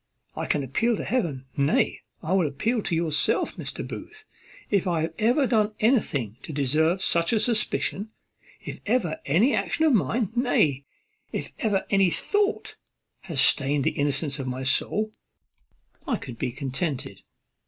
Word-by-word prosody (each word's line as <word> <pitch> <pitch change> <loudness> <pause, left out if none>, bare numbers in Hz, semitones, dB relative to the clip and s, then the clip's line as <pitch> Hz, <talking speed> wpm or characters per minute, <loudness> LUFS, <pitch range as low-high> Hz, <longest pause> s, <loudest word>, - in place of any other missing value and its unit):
I - - -4
can 145 - +1
appeal 225 - +1
to - - -4
heaven, 165 - -1
nay, 140 +2 +1 0.2
I 165 +4 -1
will 185 -5 +3
appeal 220 - -1
to 175 - -1
yourself, 160 -2 +1
Mr. - - -5
Booth, 435 0 -9 0.5
if 200 -3 +2
I 170 -3 +1
have 160 - -2
ever 245 +6 +3
done 215 -3 +1
anything 145 - +1
to - - -8
deserve 155 +6 +1
such 170 0 +3
a 225 - +3
suspicion. 215 -2 0 0.5
If - - -7
ever 205 -9 0
any 195 - +3
action 320 - +1
of 305 - +4
mine, 215 - +1
nay, 150 - +2 0.5
if - - -4
ever 205 -4 0
any 195 -2 +4
thought, 410 - -1 0.4
had 170 -6 -7
stained 140 0 +4
the - - +2
innocence 145 0 0
of 135 - -4
my 130 +1 -4
soul, 215 +10 +2 1.0
I - - +1
could 120 -2 -9
be 125 - -1
contented." 135 +2 -4
170 Hz, 155 wpm, -25 LUFS, 140-220 Hz, 1.0 s, of